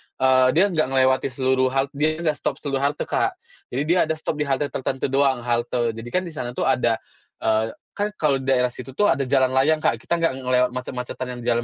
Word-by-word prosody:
eee, 130 -1 +4
dia 195 +3 +4
nggak 155 -5 +1
ngelewatin 130 0 +2
seluruh 130 0 +2
hal 135 0 +3
dia 155 +2 0
nggak 155 -2 +1
stop - - -1
seluruh 135 -2 -1
halte, 145 +1 0
Kak. - - 0 0.3
Jadi 135 +4 -2
dia 175 +3 +2
ada 160 - 0
stop 155 -1 -4
di 150 - 0
halte 140 +1 0
tertentu 135 0 -2
doang, 135 -3 +2
halte 120 0 0
jadi 115 +2 -9
kan 185 +8 0
di 170 - -7
sana 125 -5 -5
tuh - - -1
ada - - +2 0.5
eee, 110 0 +1 0.2
kan 205 +1 -2
kalau 145 -6 +1
di 130 - -8
daerah 125 -2 +3
situ 135 +1 -10
tuh 210 - +3
ada 135 -1 0
jalan 130 -1 +3
layang, 150 +4 +2
Kak, - - +2
kita 170 - -1
nggak 165 -5 +2
ngelewat 125 -1 +2
macet-macetan 125 0 -5
yang - - -9
di - - -7
jalan 120 0 +2
130 Hz, 230 wpm, -23 LUFS, 125-150 Hz, 0.5 s, eee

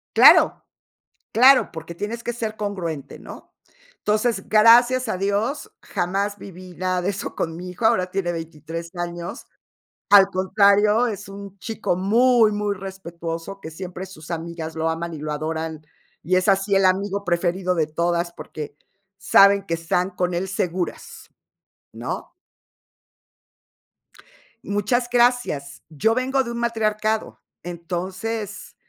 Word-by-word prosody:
Claro, - - +7 0.7
claro, 260 +4 +6
porque 165 0 -8
tienes 215 +6 -5
que 240 - -3
ser 220 -2 -4
congruente, 170 -9 -4
¿no? - - -12 0.5
Entonces, 210 -1 0
gracias 240 +3 +6
a 220 - -1
Dios, 210 - -1
jamás 200 +3 -2
viví 185 -1 -11
nada 185 0 -1
de 190 - 0
eso 195 - -6
con 165 -1 -2
mi 180 +2 -7
hijo, 180 +5 -4
ahora 185 -5 +3
tiene 180 -2 -1
23 165 0 -6
años. 175 0 -5 0.6
Al 200 -2 +8
contrario, 200 +4 +3
es 205 -5 -5
un 200 -1 -10
chico 210 -5 -2
muy 225 +3 +4
muy 205 -1 -1
respetuoso, 180 -1 -7
que 160 - -9
siempre 185 +2 -7
sus 170 -3 -11
amigas 165 -1 -5
lo 160 0 0
aman 165 +1 -3
y - - -6
lo 150 0 -4
adoran. 160 0 -4 0.4
Y 185 +3 +2
es 185 - 0
así 195 0 +3
el 195 - +3
amigo 200 +2 +1
preferido 180 +1 0
de 160 -2 +1
todas, 170 +2 -1
porque 150 -3 -8 0.4
saben 200 +1 +5
que 165 - -3
están 180 +3 -1
con 180 0 -1
él 180 +2 -2
seguras, 180 -1 -4 0.7
¿no? - - -6 2.3
Muchas 220 +5 0
gracias. 240 - +1
Yo 190 +9 +1
vengo 265 +1 +1
de 235 - -6
un 235 - -5
matriarcado, 220 -2 -1 0.2
entonces, 185 +5 -5
190 Hz, 135 wpm, -22 LUFS, 170-215 Hz, 2.3 s, Al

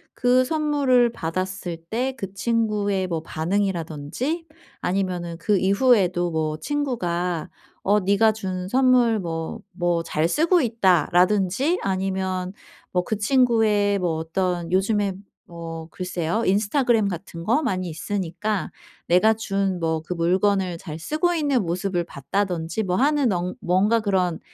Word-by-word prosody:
그 250 +1 +3
선물을 280 -5 +2
받았을 185 0 -4
때 255 +4 -1
그 195 -5 -6
친구의 205 -3 0
뭐 165 -3 -2
반응이라든지 180 - -2 0.3
아니면은 180 -3 -2
그 210 0 +2
이후에도 190 -4 +3
뭐 155 -1 -1
친구가 180 - -2 0.3
"어 205 +2 +3
네가 200 +3 +4
준 185 -4 -4
선물 250 -2 +4
뭐 165 -3 -4
뭐 175 -1 0
잘 155 0 0
쓰고 335 - +3
있다."라든지 195 - +2
아니면 190 -1 -2 0.4
뭐 180 0 +1
그 215 +4 -2
친구의 215 -4 +3
뭐 175 -3 0
어떤 175 +1 -2
요즘에 200 +1 +1 0.3
뭐 165 -1 -8
글쎄요 180 +3 -2
인스타그램 215 +2 +2
같은 170 -2 -7
거 240 +9 +2
많이 185 -9 -1
있으니까 190 +4 -3 0.4
내가 180 +6 +5
준 195 -4 -1
뭐 160 -1 -1
그 175 - -4
물건을 185 +1 +1
잘 160 -2 -7
쓰고 310 - 0
있는 285 -7 +1
모습을 175 +1 -1
봤다든지 175 - -2
뭐 180 -2 -1
하는 285 -3 +2
언 180 +1 -2
뭔가 200 +6 +2
그런 185 -5 0
190 Hz, 265 characters per minute, -23 LUFS, 175-225 Hz, 0.4 s, 내가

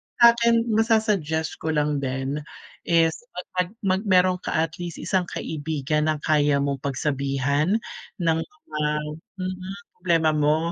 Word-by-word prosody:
sakin 235 0 +6 0.2
masa-suggest 210 -8 +1
ko 160 -1 -1
lang 150 -1 +1
din 135 +2 -2 0.5
is 165 -1 +4 0.2
mag-ano, 180 +1 -2
mag 190 0 +2
meron 185 -1 +4
ka - - -3
at 160 0 +1
least 175 -2 -5
isang 185 -2 -1
kaibigan 150 0 -2
ng 155 -1 +1
kaya 145 -2 +3
mong 140 -1 -1
pagsabihan 140 +4 0 0.5
ng 165 -1 +2
mga 310 - -7 0.6
mm 185 +1 -4 0.2
problema 165 -3 +3
mo. 155 +2 +2
160 Hz, 130 wpm, -24 LUFS, 150-185 Hz, 0.6 s, sakin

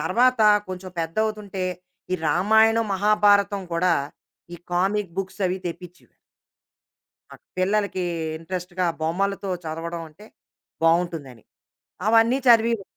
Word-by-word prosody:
తర్వాత 255 0 +2 0.3
కొంచెం 185 0 -7
పెద్దవుతుంటే, 200 +2 -2 0.5
ఈ - - +3
రామాయణం, 220 +6 +4
మహాభారతం 205 0 +3
కూడా, 170 +1 +2 0.6
ఈ - - -8 0.2
కామిక్ 190 0 0
బుక్సవి 190 -1 -2
తెప్పించుడు. 180 +1 -9 1.2
ఆ - - -10 0.2
పిల్లలకీ 195 0 0 0.3
ఇంట్రెస్ట్‌గా 180 +2 -4 0.2
బొమ్మలతో 195 +5 -1
చదవడం 165 +1 -5
అంటే 165 +8 -17 0.6
బావుంటుందని, 165 -8 0 0.6
అవన్నీ 225 +3 +4
చదివీరు. 230 -2 +4
190 Hz, 95 wpm, -23 LUFS, 175-210 Hz, 1.2 s, రామాయణం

